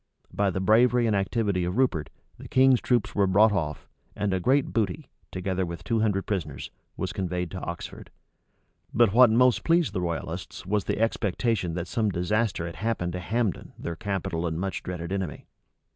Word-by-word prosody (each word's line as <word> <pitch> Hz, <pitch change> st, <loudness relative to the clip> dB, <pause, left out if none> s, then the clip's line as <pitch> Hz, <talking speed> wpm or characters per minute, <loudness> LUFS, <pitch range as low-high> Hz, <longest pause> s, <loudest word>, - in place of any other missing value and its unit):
By 100 Hz, -1 st, +1 dB
the 95 Hz, -, -2 dB
bravery 120 Hz, +5 st, +4 dB
and 110 Hz, -2 st, +2 dB
activity 100 Hz, -1 st, 0 dB
of 90 Hz, +4 st, -2 dB
Rupert, 90 Hz, -, +1 dB, 0.3 s
the -, -, -9 dB
king's 130 Hz, -1 st, +4 dB
troops 120 Hz, -4 st, +1 dB
were 100 Hz, -2 st, +2 dB
brought 105 Hz, +4 st, +5 dB
off, 80 Hz, -7 st, -2 dB, 0.3 s
and 100 Hz, -1 st, -1 dB
a 95 Hz, -, +1 dB
great 135 Hz, +8 st, +2 dB
booty, 115 Hz, -, -1 dB, 0.2 s
together 95 Hz, 0 st, -2 dB
with 85 Hz, -1 st, -6 dB
two 115 Hz, +5 st, 0 dB
hundred 100 Hz, -3 st, +1 dB
prisoners, 75 Hz, -9 st, -4 dB, 0.3 s
was -, -, -3 dB
conveyed 90 Hz, -2 st, -3 dB
to 95 Hz, -, -5 dB
Oxford. 85 Hz, -1 st, -7 dB, 0.9 s
But 115 Hz, -3 st, +4 dB
what 125 Hz, 0 st, +7 dB
most 125 Hz, +2 st, +4 dB
pleased 165 Hz, -1 st, +2 dB
the 90 Hz, -, -1 dB
royalists 85 Hz, 0 st, -4 dB
was 105 Hz, +1 st, 0 dB
the -, -, -1 dB
expectation 110 Hz, -4 st, 0 dB
that 90 Hz, 0 st, -3 dB
some 110 Hz, +4 st, 0 dB
disaster 100 Hz, 0 st, 0 dB
had 85 Hz, -1 st, -7 dB
happened 95 Hz, -4 st, -2 dB
to 90 Hz, -, -3 dB
Hambden 110 Hz, +2 st, -2 dB
their 85 Hz, -, -5 dB
capital 95 Hz, -2 st, -2 dB
and 80 Hz, 0 st, -3 dB
much 95 Hz, +1 st, -3 dB
dreaded 90 Hz, -1 st, -5 dB
enemy. 95 Hz, -6 st, -3 dB
95 Hz, 180 wpm, -26 LUFS, 90-115 Hz, 0.9 s, what